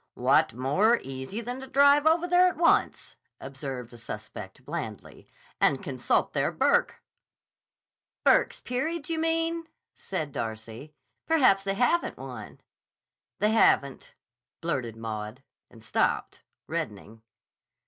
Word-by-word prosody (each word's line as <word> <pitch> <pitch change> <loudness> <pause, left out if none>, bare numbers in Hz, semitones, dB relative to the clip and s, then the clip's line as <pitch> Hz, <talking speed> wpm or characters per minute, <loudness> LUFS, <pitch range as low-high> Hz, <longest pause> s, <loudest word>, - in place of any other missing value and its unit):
"What - - +3
more 185 - +2
easy 135 - -6
than 245 +2 -5
to 265 - -9
drive 285 +3 +5
over 330 +2 +3
there 355 +1 +5
at 365 - -2
once," 335 - +1 0.2
observed 135 -3 -7
the 120 - -12
suspect 105 +1 -9
blandly, 145 -10 -7 0.3
"and 140 -2 +2
consult 130 -3 0
their - - +1
Burke." 485 +1 +1 1.2
"Burke's - - +3
Peerage, 310 +6 -3
you 325 - -1
mean?" 330 0 -1 0.3
said 155 -7 -4
Darcy. 115 +5 -6 0.3
"Perhaps 255 -12 +4
they 195 0 0
haven't 250 +10 +1
one." - - -9 0.8
"They 210 +3 +2
haven't," 140 -11 +2 0.4
blurted 130 -9 -3
Maud, 110 +2 -6 0.3
and 115 -2 -17
stopped, 100 - -1 0.2
reddening. 115 -8 -5
155 Hz, 115 wpm, -27 LUFS, -, 1.2 s, drive